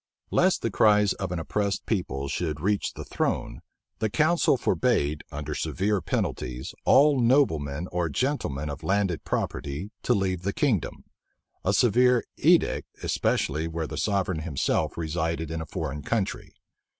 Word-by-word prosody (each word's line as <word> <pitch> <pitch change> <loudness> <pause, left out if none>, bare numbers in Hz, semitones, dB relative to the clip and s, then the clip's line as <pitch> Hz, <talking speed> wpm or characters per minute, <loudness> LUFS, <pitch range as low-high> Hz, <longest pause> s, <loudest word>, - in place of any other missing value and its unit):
Lest - - +3
the - - 0
cry 105 -1 +5
of 95 -2 -3
an 90 - -2
oppressed 100 +4 -2
people 80 -10 -2
should 75 +1 -2
reach 100 +5 0
the - - -7
throne, - - -2 0.4
the 110 - 0
council 155 +2 +3
forbade, 75 - +1
under 75 +1 -4
severe 100 +5 -1
penalties, 60 -4 -3
all 140 0 +5
noblemen 85 - +2
or 85 -2 0
gentlemen 75 - -1
of 70 -1 -5
landed 95 -4 0
property 75 +9 -3
to - - +2
leave 95 -3 -1
the 100 +2 -2
kingdom, 120 - 0 0.6
a - - +2
severe 125 +1 +4
edict, - - +3 0.2
especially 80 +3 0
where 80 0 -3
the 75 - -6
sovereign 95 -2 0
himself 80 0 -1
resided 80 0 -2
in 80 0 -3
a 80 - -6
foreign 75 -5 -4
country. 110 +1 -2
90 Hz, 145 wpm, -26 LUFS, 75-105 Hz, 0.6 s, cry